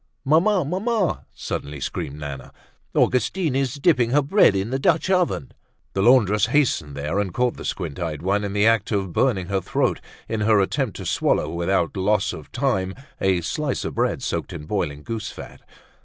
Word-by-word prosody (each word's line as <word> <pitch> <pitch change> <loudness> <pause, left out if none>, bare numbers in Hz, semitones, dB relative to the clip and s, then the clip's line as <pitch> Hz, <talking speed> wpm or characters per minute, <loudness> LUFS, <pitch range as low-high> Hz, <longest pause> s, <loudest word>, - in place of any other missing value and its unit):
"Mamma! 170 +5 +3
Mamma!" 195 - -1
suddenly 70 0 -5
screamed 70 +1 -4
Nana, 70 -3 -7 0.4
"Augustine 150 +3 +1
is 135 -1 0
dipping 140 -5 +3
her 145 +4 +3
bread 150 - +4
in 95 +4 -1
the 135 - 0
Dutch 165 +5 +2
oven!" 175 -9 +1 0.4
The 95 - 0
laundress 105 -3 +4
hastened 115 - +1
there 75 +7 -1
and 100 -3 -1
caught 125 +5 0
the - - -9
squint 80 -7 -4
eyed 80 -4 -4
one 100 +2 +1
in 100 -1 -3
the 105 +1 +3
act 115 -2 +3
of 95 -4 -1
burning 100 -6 +1
her 95 -1 0
throat - - 0 0.3
in 110 - -2
her 105 0 +4
attempts 95 - 0
to - - -7
swallow - - +1
without 85 0 0
loss 95 +1 +1
of - - -10
time 115 -8 0 0.2
a 95 -2 +2
slice 140 - -2
of - - -3
bread - - 0
soaked - - -3
in 75 - -7
boiling 75 -6 -2
goose 115 +1 -4
fat. - - -10
105 Hz, 185 wpm, -23 LUFS, 95-135 Hz, 0.4 s, bread